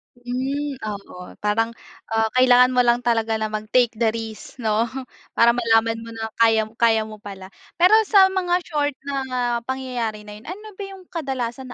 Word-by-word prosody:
Hmm, 265 +3 -3
oo. 200 -4 -8
Parang, 225 +2 0 0.3
ah, 225 -1 0
kailangan 255 0 +5
mo 250 - +1
lang 240 0 +3
talaga 225 -2 +1
na 215 -1 -2
mag-take 220 +3 +1
the 230 - +3
risk, 225 -1 -7
'no? 220 +2 +1 0.5
Para 235 0 +6
malaman 225 -1 +2
mo 230 0 -9
na 220 0 -5
kaya 225 -1 +4 0.2
kaya 225 -2 +4
mo 215 -1 -10
pala. 195 -2 -10 0.2
Pero 360 +4 +4 0.2
sa 380 -2 +6
mga 360 -2 0
short 290 -3 -1
na 255 -4 -2
pangyayari 245 -5 -3
na 210 0 -10
yun, 240 - -18
ano 420 +4 -8
ba - - -3
yung 385 -1 -11
kadalasan 265 -5 -4
235 Hz, 170 wpm, -22 LUFS, 220-265 Hz, 0.5 s, Para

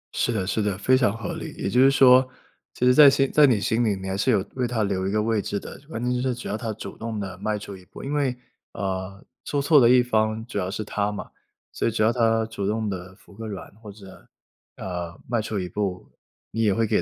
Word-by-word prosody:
是 - - +1
的 100 -5 -1
是 100 +3 -1
的， 105 -2 -1
非 130 +6 +3
常 125 -5 +2
合 115 - -5
理。 - - -7
也 - - -3
就 125 +6 +3
是 135 - +7
说 130 -1 +6 0.5
其 125 - -1
实 125 - +6
在 145 +1 +9
心 135 0 +1
在 150 -2 +6
你 115 -5 +3
心 115 +3 +1
里 105 -3 +1
你 95 0 -7
还 95 - -2
是 100 - 0
有 100 -4 +1
为 125 -2 0
她 115 -2 -1
留 95 -2 -1
一 95 - -1
个 105 0 +1
位 110 -1 0
置 100 0 -3
的， - - -10
关 115 -6 -5
键 125 0 0
就 125 - -1
是 130 -2 -1
只 120 - -8
要 - - -2
她 110 0 -4
主 100 - -8
动 115 -1 -4
地 95 -2 -6
迈 105 +1 -1
出 100 -1 -8
一 95 - -14
步。 - - -12
因 140 - -4
为， 135 -4 0 0.4
呃， 95 0 -4 0.2
做 145 - -2
错 145 0 +5
的 120 - +6
一 125 0 +6
方 110 -2 0
主 120 -4 -4
要 90 - -2
是 110 +2 -4
她 105 0 -2
嘛， 105 - -7 0.4
所 - - -1
以 - - +1
只 110 - 0
要 110 +2 +3
她 115 -2 +2
主 110 -3 -4
动 110 +1 -1
地 95 -1 -7
服 100 - -20
个 110 +2 -7
软 100 -1 -8
或 105 -3 -9
者， 100 -2 -15 0.5
呃， 85 -1 -6
迈 120 -1 0
出 110 -1 -3
一 90 - -3
步， 95 0 -4 0.4
你 115 - -2
也 105 -2 +3
会 115 +1 +1
给 110 0 +1
110 Hz, 285 characters per minute, -24 LUFS, 100-125 Hz, 0.5 s, 在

